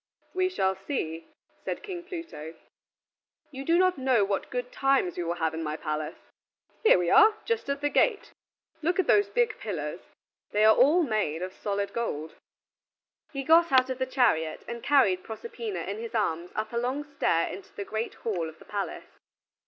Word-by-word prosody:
"We 370 0 +1
shall 190 - +1
see," 165 - -4 0.4
said - - -4
King 370 -4 -6
Pluto; 330 - -7 1.0
"you 270 -1 -6
do 335 +4 +3
not 370 -3 +3
know 255 -6 +3
what 200 0 -2
good 250 0 -4
times 270 -10 +2
we 175 - -2
will 170 +1 -2
have 160 -2 -1
in 160 - -4
my 155 -1 -3
palace. 155 -1 -3 0.7
Here 440 - +7
we 175 -1 0
are, 430 0 +7
just 460 -10 -1
at 280 0 -1
the 290 - +1
gate. 425 +7 +2 0.5
Look 345 +3 +1
at 380 - +2
the 405 +4 +4
big 475 -3 +2
pillars; 170 -5 -4 0.5
they 210 +1 +4
are 220 0 +7
all 305 +8 +5
made 210 - -1
of 185 0 -5
solid 200 0 -3
gold." 160 -10 -3 1.0
He 275 -2 -4
got 330 +3 +5
out 260 0 +4
of 260 - -4
the 260 - 0
chariot 205 - +1
and 235 0 -5
carried 215 -11 +3
Proserpina 430 - -5
in 200 +2 -4
his 230 0 -6
arms 175 -5 0
up 215 +1 -3
a - - -1
long 255 +5 -1
stair 280 - 0
into 190 - -9
the 200 - -5
great 220 +3 -3
hall 175 -8 -2
of 160 - -14
the - - -16
palace. 205 -1 -5
230 Hz, 185 wpm, -28 LUFS, 180-295 Hz, 1.0 s, Here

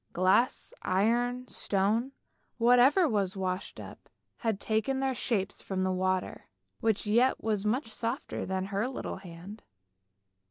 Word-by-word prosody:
Glass, 190 - +2
iron, 240 +6 +1
stone, 215 +6 0 0.5
whatever 250 +8 +5
was 200 -6 0
washed 185 0 -3
up, - - -11 0.3
had 225 -4 -1
taken 220 +6 0
their 265 -1 0
shapes 210 -5 -1
from 190 -1 -2
the 185 - +1
water, 185 0 -1 0.3
which 220 -2 0
yet 235 +5 +3
was 215 -2 0
much 245 +7 +1
softer 230 +4 -3
than 190 0 -2
her 205 +5 +1
little 260 - -5
hand. 190 +3 -10
215 Hz, 130 wpm, -30 LUFS, 190-245 Hz, 0.5 s, whatever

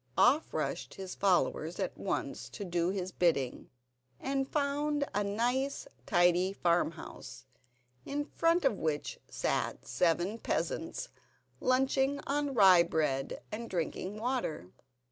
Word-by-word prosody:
Off 280 +6 +4
rushed - - -3
all 195 - -6
his 185 - -6
followers 480 - +1
at - - -2
once - - -3
to 205 - -6
do 175 -1 0
his 185 -1 -2
bidding, 155 -9 0 0.5
and 270 0 -1
found 290 0 0
a 205 +1 +1
nice, 245 +7 0 0.2
tidy 175 +2 +4
farmhouse, 170 -6 -2 0.6
in 290 +1 -2
front 330 +1 +2
of 225 -7 +2
which 150 -2 -2
sat - - -1
seven 175 +5 +1
peasants, - - -2 0.5
lunching 265 +2 +2
on 285 -1 -1
rye 190 -5 +8
bread 150 -5 -1
and 230 +2 -5
drinking 185 +3 -3
water. 225 - -2
205 Hz, 125 wpm, -32 LUFS, 175-275 Hz, 0.6 s, rye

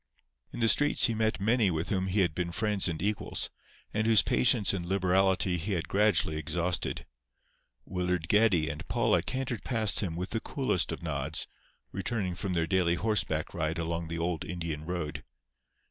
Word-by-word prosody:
In - - -6
the 115 - +4
streets 145 +6 +5
he 115 - +2
met 110 -1 0
many 110 +1 +2
with 80 0 -2
whom 95 -2 0
he 100 +2 +1
had 85 -4 +1
been 85 +1 -2
friends 105 +1 +1
and 80 -2 -4
equals, 105 +1 -2 0.4
and 110 +1 0
whose 110 -4 +5
patience 120 -6 +3
and 95 -3 -3
liberality 95 0 +2
he 95 +5 -2
had 85 -3 -2
gradually 100 -6 +2
exhausted. 85 +4 -2 0.8
Willard 90 -2 -2
Geddie 100 -5 +3
and 75 0 -6
Paula - - +2
cantered 130 -4 -3
past 110 -4 +2
him 90 -6 -1
with 90 +2 -5
the 115 - -1
coolest 130 - 0
of - - -6
nods, 70 -5 -1 0.5
returning 95 -1 -2
from 95 +1 -3
their 85 -2 +1
daily 85 -1 +2
horseback 105 +2 -1
ride 80 +2 -2
along 85 0 -3
the 85 +1 -4
old 85 -1 -2
Indian 80 -3 -5
road. 85 -4 -4
90 Hz, 175 wpm, -29 LUFS, 85-105 Hz, 0.8 s, streets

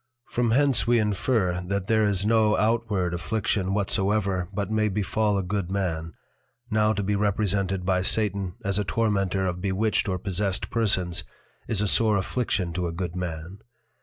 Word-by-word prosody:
_ - - -22
From 120 -1 +1
hence 130 -4 +3
we 120 0 +4
infer, 105 -3 0
that 100 0 -2
there 110 +1 +2
is 100 -1 0
no 110 -1 +3
outward 105 -5 0
Affliction 95 +1 -1
whatsoever 100 -2 0
but 100 0 -3
may 110 0 +1
befal 105 +1 0
a 95 - -1
good 95 -1 -2
Man; 85 -4 -2 0.6
now 110 0 +3
to 105 -2 -1
be 100 +1 0
represented 100 -2 0
by 90 -1 +2
Satan 100 -2 +1
as 100 +1 +1
a - - +1
Tormentor 100 -1 0
of 90 -1 -3
Bewitched 100 +2 0
or 95 - -1
Possessed 95 +1 -2
Persons, 95 -6 +1 0.4
is 110 -4 +1
a 105 - +1
sore 110 0 +4
Affliction 95 -3 -1
to 90 0 -2
a - - -3
good 85 0 -4
man. 90 +1 -5
100 Hz, 170 wpm, -25 LUFS, 90-110 Hz, 0.6 s, we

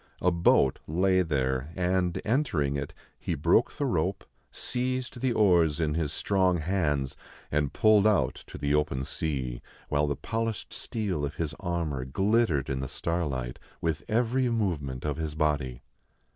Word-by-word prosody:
A 90 - +4
boat 85 -6 +3
lay 95 +4 +3
there; 70 -3 -1
and, 90 -1 +1
entering 105 - +1
it, 70 0 -3 0.3
he - - -2
broke 85 - +3
the 145 - -2
rope, 95 - 0 0.3
seized 125 -1 -2
the 130 -1 +2
oars 85 -8 +4
in 75 -2 +1
his 80 -2 -1
strong 95 -3 +2
hands, 75 -6 0 0.4
and 75 -2 +1
pulled 110 +4 +5
out 105 -5 +3
to - - -9
the 70 0 0
open 75 -3 +1
sea, 65 -4 -3 0.3
while 75 0 +2
the 70 - 0
polished 115 -1 -3
steel 100 -9 -2
of 70 +2 -3
his 80 -3 -2
armor 85 -7 -2
glittered 95 - +1
in 65 -1 -2
the 65 - -3
starlight 70 -7 -2 0.2
with 80 -2 -1
every 125 +3 +1
movement 80 - -1
of 75 -1 -1
his 80 -2 -3
body. 70 -5 0
80 Hz, 155 wpm, -28 LUFS, 70-100 Hz, 0.4 s, pulled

